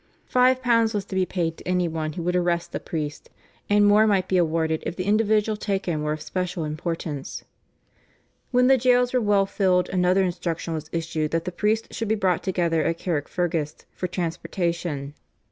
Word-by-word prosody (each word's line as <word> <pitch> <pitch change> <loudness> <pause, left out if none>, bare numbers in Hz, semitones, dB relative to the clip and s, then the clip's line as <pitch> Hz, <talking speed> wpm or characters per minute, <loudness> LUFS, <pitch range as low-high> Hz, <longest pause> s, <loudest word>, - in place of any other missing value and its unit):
Five 255 +1 +3
pounds 230 -2 +3
was 200 -2 -1
to 195 - -7
be 185 -1 +1
paid 165 -3 -2
to - - -12
any 180 -1 +1
one 160 -1 -3
who 170 - -5
would 180 +1 0
arrest 175 -1 0
a - - -2
priest, 150 -2 -5 0.4
and 205 0 +5
more 210 +2 +5
might 190 -3 +2
be 185 - +2
awarded 160 -2 +1
if - - -4
the 185 - -3
individual 215 +1 +2
taken 195 -6 -2
were 150 0 -1
of 155 - -6
special 180 -2 -3
importance. 155 -2 -4 1.1
When 250 -1 +3
the 265 0 +5
jails 250 0 +3
were 250 - +3
well 205 -2 +3
filled, 185 -2 +1
another 185 +1 +2
instruction 175 -2 -2
was 155 -1 -5
issued 160 -2 -2
that 165 +1 -1
the 180 - -3
priests 215 +5 -1
should 225 - -2
be 220 - +2
brought 185 -4 +1
together 170 -4 0
at 165 - 0
Carrickfergus 165 -1 -2
for 180 - -3
transportation. 170 -4 -3
180 Hz, 185 wpm, -24 LUFS, 165-205 Hz, 1.1 s, and